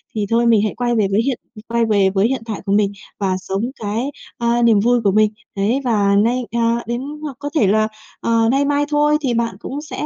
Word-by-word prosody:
Thì 210 -2 0
thôi 235 +1 +2
mình 225 -3 +4
hãy 215 - -1
quay 240 0 0
về 215 -3 +2
với 210 +3 +3
hiện 260 0 -1 0.3
quay 235 0 +1
về 200 -3 +3
với 195 +2 +2
hiện 265 0 -2
tại 220 -3 -5
của 195 - -2
mình 205 -1 +3 0.3
và 190 -2 0
sống 190 +2 -3 0.2
cái, 225 +7 -2 0.3
ờ, 235 0 +1
niềm 230 -3 +5
vui 240 +3 +2
của 200 - +3
mình. 215 +1 +3 0.2
Đấy, 215 +7 0
và 205 -5 +2
nay 235 +5 +2
à, 235 0 +1
đến 240 +1 -2 0.2
hoặc 290 -4 -6
có 290 - -4
thể 230 -10 +3
là, 215 +2 +3 0.3
ờ, 230 0 +2
nay 275 +2 +2
mai 290 0 +1
thôi 295 0 +3
thì 260 -4 0
bạn 230 -3 -1
cũng 280 +4 -5
sẽ 300 0 -5
230 Hz, 240 wpm, -19 LUFS, 210-245 Hz, 0.3 s, niềm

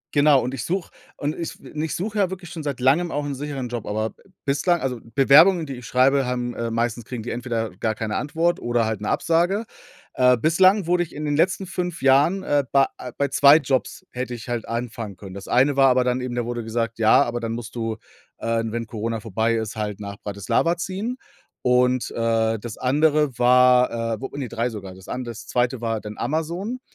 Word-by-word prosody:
Genau, 145 -1 +6
und 125 - -3
ich 125 -3 -4
suche 185 0 -3 0.3
und 145 +2 -2
ich 170 - -6
w - - -13
und 150 - -4
ich 160 -1 -2
suche 210 +4 -3
ja 195 -3 +2
wirklich 180 -3 -8
schon 165 - -6
seit 145 -4 -4
Langem 140 +8 +3
auch 145 -1 -2
'n 145 - -3
sicheren 140 -2 -4
Job, 120 -2 -5
aber 110 +1 -1
b - - -27 0.2
bislang 145 +5 +2
also 130 -4 -3 0.2
Bewerbungen, 160 +6 +6
die 135 -3 -6
ich 125 -1 -10
schreibe, 135 +2 +3
haben 125 -1 -2
äh, 115 0 -3
meistens 115 0 -1
kriegen 120 -2 -6
die 120 - -5
entweder 115 -3 -3
gar 110 +2 -1
keine 110 -1 -3
Antwort 165 +4 0
oder 120 -1 0
halt 110 -2 -3
'ne 105 - -2
Absage, 175 +7 +1 0.5
äh, 125 -1 +4
bislang 185 - +4
wurde 175 +1 +2
ich 175 - -5
in 150 +1 -4
den 145 -1 0
letzten 185 +5 +1
5 180 -2 -4
Jahren 145 +8 +4
äh, 145 -4 +2
bei, 135 -1 +5
äh, 125 - -7
bei 140 0 0
2 140 +2 +7
Jobs 135 -6 -2
hätte 125 0 -4
ich 115 0 -10
halt 120 -2 -3
anfangen 115 -4 -5
können. 95 -1 -10
Das 100 +1 -9
eine 135 +3 +3
war 135 -1 +6
aber 125 0 +3
dann 125 0 0
eben 125 -1 -4
da 120 -1 -1
wurde 120 -1 -4
gesagt: 115 0 -3
„Ja, 110 -1 +6
aber 120 0 -3
dann 115 -1 -3
musst 115 -1 -6
du, 115 -2 -3 0.4
äh, 115 0 -1
wenn 115 +1 -3
Corona 115 0 -3
vorbei 110 +1 0
ist, 110 -1 -3
halt 105 -2 -4
nach 100 -1 -7
Bratislava 105 - 0
ziehen.“ 195 +8 -4 0.5
Und, 125 0 +2
äh, 115 -1 +1
das 115 0 -7
andere 150 0 +2
war, 125 -2 +4
äh, - - -16
wo 135 - -3
ne, 135 -3 -3
3 115 +3 -2
sogar. 100 -5 -8
Das 95 0 -15
an 125 - -4
das 120 -1 -8
2. 120 0 0
war 115 -2 -2
dann 105 0 -8
Amazon, 170 - -2
125 Hz, 225 wpm, -23 LUFS, 115-150 Hz, 0.5 s, 2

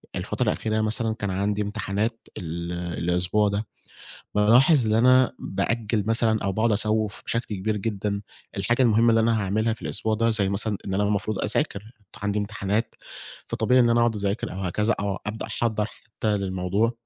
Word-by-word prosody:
الفترة - - -2
الأخيرة 110 0 0
مثلًا 110 +1 0
كان 100 -2 -3
عندي 100 +2 0
امتحانات 105 +2 -2
ال 85 -1 -5 0.3
الأسبوع 90 +5 +1
ده، 105 +2 -2 0.7
بالاحظ 120 +6 +5
إن 110 - +2
أنا 130 +3 +5
بأجل 105 +2 -1
مثلًا 115 -1 +2
أو 100 - 0
باقعد 110 +3 +1
أسوِّف 110 0 0
بشكل 115 -3 -2
كبير 105 +3 -1
جدًا 100 -1 -2 0.4
الحاجة 120 +6 +1
المُهمة 115 0 +4
اللي 115 0 +4
أنا 110 -1 +2
هاعملها 110 +3 0
في 110 - -12
الأسبوع 110 +1 -1
ده 115 +1 +2
زي 105 -4 +2
مثلًا 100 +1 -1
إن 95 - -3
أنا 100 +2 +1
المفروض 105 0 -1
أذاكر، 105 -2 -1 0.3
عندي 105 0 0
امتحانات 105 +2 -2 0.5
فطبيعي 130 0 +2
إن 120 -1 +5
أنا 115 0 +3
أقعد 115 -1 +2
أذاكر 100 +1 -2
أو 95 - -6
هكذا 105 +5 0
أو 100 -1 -1
أبدأ 110 +1 -4
أحضّر 110 -3 -1
حتى 110 -1 -3
للموضوع. 95 +3 0
105 Hz, 170 wpm, -25 LUFS, 100-115 Hz, 0.7 s, بالاحظ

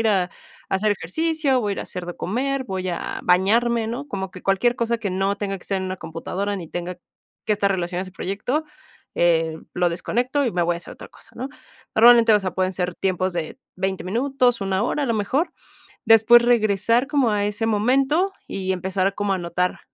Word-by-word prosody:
ir 225 - +2
a 190 -3 +1 0.4
hacer 205 +2 +2
ejercicio, 280 - 0
voy 205 -3 -1
ir - - -8
a - - -3
hacer 180 -1 -5
de 175 - -5
comer, 260 +6 -1
voy 185 -4 -3
a 175 - -4
bañarme, 225 +6 +3
¿no? 245 +5 -4
Como 190 -6 -4
que 185 - -11
cualquier 215 +5 +2
cosa 235 0 0
que 205 -4 -3
no 195 +2 0
tenga 200 -1 -3
que - - -16
ser 195 -1 -1
en 190 - -3
una 185 0 -4
computadora 180 +5 -4
ni 170 -4 -7
tenga 175 +2 -4 0.5
que 215 - +3
estar 200 -1 +1
relacionado 180 -1 -2
a - - -5
ese 185 - -12
proyecto, 215 - -2 0.5
eh, 165 -2 +2 0.2
lo 180 0 +2
desconecto 245 +11 -1
y 235 - -1
me 175 - +1
voy 175 0 +1
a 170 - -5
hacer 170 - -10
otra - - -11
cosa, - - -16
¿no? 255 +3 -4 0.5
Normalmente, 235 0 +7
o - - +5
sea, 185 -1 -3
pueden 185 0 0
ser 180 -1 -2
tiempos 185 -1 0
de 170 +7 -4 0.2
20 190 0 -2
minutos, 245 +3 +1
1 195 0 0
hora, 290 +4 0
a - - -3
lo 230 - +1
mejor, 270 - 0 0.5
después 225 +1 +7
regresar 230 +1 +3
como 280 -6 +2
a 205 -1 +1
ese 210 +2 -2
momento 270 - +2
y 190 -1 -2
empezar 190 +1 -1
como 205 -1 -1
a - - -2
notar, 175 +1 -1
200 Hz, 210 wpm, -22 LUFS, 185-240 Hz, 0.5 s, Normalmente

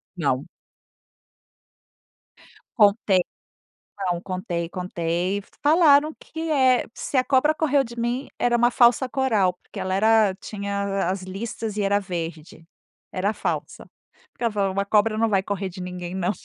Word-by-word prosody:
Não. - - -1 2.3
Contei, 205 -3 +4 0.8
não, 180 -3 -1
contei, 180 -2 -4
contei, 180 +1 -2 0.2
falaram 305 -1 +5
que 325 +1 -6
é 260 -3 +4
se - - -4
a 255 - +3
cobra 275 +3 +3
correu 290 -3 +2
de 235 -2 -10
mim 240 +3 -2
era 240 0 +2
uma 240 +1 +3
falsa 245 +1 +4
coral, 225 -9 +1
porque - - -11
ela 185 - -2
era 215 0 +4
tinha 200 -1 -2
as 190 0 -3
listas 210 +3 -5
e 210 - 0
era 200 +1 +2
verde, 165 -4 -6 0.5
era 195 +3 0
falsa, - - -4 0.5
porque - - -7
ela 230 - +1
falou 200 -2 0
uma 200 +1 -1
cobra 215 +2 +2
não 225 0 +2
vai 195 -3 +2
correr 195 0 -3
de 185 0 -10
ninguém 180 0 -6
não. 185 -1 0
200 Hz, 145 wpm, -24 LUFS, 185-240 Hz, 2.3 s, falaram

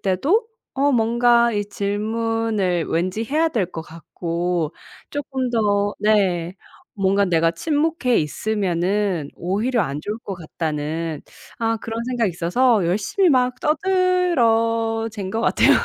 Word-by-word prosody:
때도 285 - +1 0.3
어 280 +1 +2
뭔가 235 0 +3 0.2
질문을 210 -3 -1
왠지 185 +6 -1
해야 310 +7 +1
될 220 - 0
것 160 - -5
같고 170 0 -3 0.4
쪼끔 265 -3 -3
더 205 -3 +1
네. 190 -5 +1 0.4
뭔가 195 0 +2
내가 165 -3 +2
침묵해 295 - 0
있으면은 185 -1 -1
오히려 215 +7 -1
안 140 -5 -2
좋을 210 +2 -4
것 195 - -4
같다는 160 -1 -4 0.4
아 225 -1 0
그런 230 +1 -5
생각이 240 -3 0
있어서 200 +6 +2
열심히 210 - +2
막 250 -1 +2
떠들어댄 230 - +1
것 225 - -2
같아요. - - +3
215 Hz, 235 characters per minute, -21 LUFS, 180-240 Hz, 0.4 s, 뭔가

